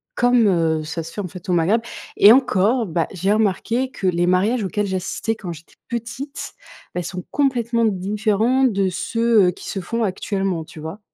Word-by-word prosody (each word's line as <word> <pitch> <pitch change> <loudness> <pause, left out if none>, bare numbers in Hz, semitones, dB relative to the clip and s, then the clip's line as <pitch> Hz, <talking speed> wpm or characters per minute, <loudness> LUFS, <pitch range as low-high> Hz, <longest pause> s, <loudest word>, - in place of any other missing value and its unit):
comme, 245 -2 +4
heu, 165 -4 +1
ça 160 +1 -4
se 165 - -9
fait, - - -8
en 185 - -4
fait, 180 +1 -10
au 180 - +2
Maghreb. 180 +7 +2 0.3
Et 205 - +8
encore, 230 -1 +3
bah, 165 -2 -1
j'ai 195 +2 0
remarqué 225 +5 0
que 190 - -3
les 175 -1 +1
mariages 205 +6 +2
auxquels 205 +2 -1
j'assistais 190 +4 -2
quand 180 -5 -7
j'étais 165 0 -12
petite, 240 +4 -5 0.4
bah 180 - -2
ils - - -6
sont 180 0 -6
complètement 240 -4 +1
différents 210 +5 +1
de 200 -7 +2
ceux, 230 +2 +2
heu, 180 - +3
qui - - -11
se 195 - -3
font 230 +6 -2
actuellement, 195 -3 -2
tu 155 +1 -13
vois? 160 +6 -7
200 Hz, 195 wpm, -21 LUFS, 180-230 Hz, 0.4 s, Et